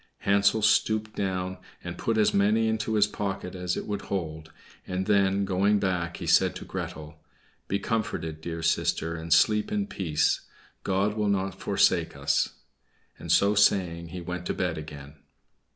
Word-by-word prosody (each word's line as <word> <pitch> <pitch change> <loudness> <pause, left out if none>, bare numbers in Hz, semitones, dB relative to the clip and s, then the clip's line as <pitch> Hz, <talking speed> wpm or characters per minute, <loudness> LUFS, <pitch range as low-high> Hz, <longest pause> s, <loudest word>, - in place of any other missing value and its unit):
Hansel 100 +2 +3
stooped 110 0 +2
down, 95 -1 -2 0.2
and - - -5
put 115 - -1
as 105 - +3
many 105 +3 +3
into 110 0 -1
his 105 -1 +5
pocket 100 -3 -4
as 90 -1 -2
it - - -4
would 105 -1 -3
hold; 80 -5 -5 0.4
and 90 +1 -2
then, 100 -1 +2
going 100 +2 +2
back, 90 -3 -1
he - - -6
said - - +4
to - - -7
Gretel, 75 0 -7 0.5
"Be 100 - 0
comforted, 95 -7 -3
dear 85 0 -5
sister, 80 0 0
and 80 0 -7
sleep 105 - +4
in 205 -1 0
peace; 90 - 0 0.4
God 100 +2 +1
will 105 -1 0
not 95 -1 -1
forsake - - +2
us." 70 0 0 0.6
And - - -4
so 100 +1 +4
saying, 90 -5 +2
he 90 +2 -7
went 90 +1 -5
to - - -2
bed 90 -3 -1
again. 75 -2 -9
95 Hz, 165 wpm, -27 LUFS, 85-105 Hz, 0.6 s, his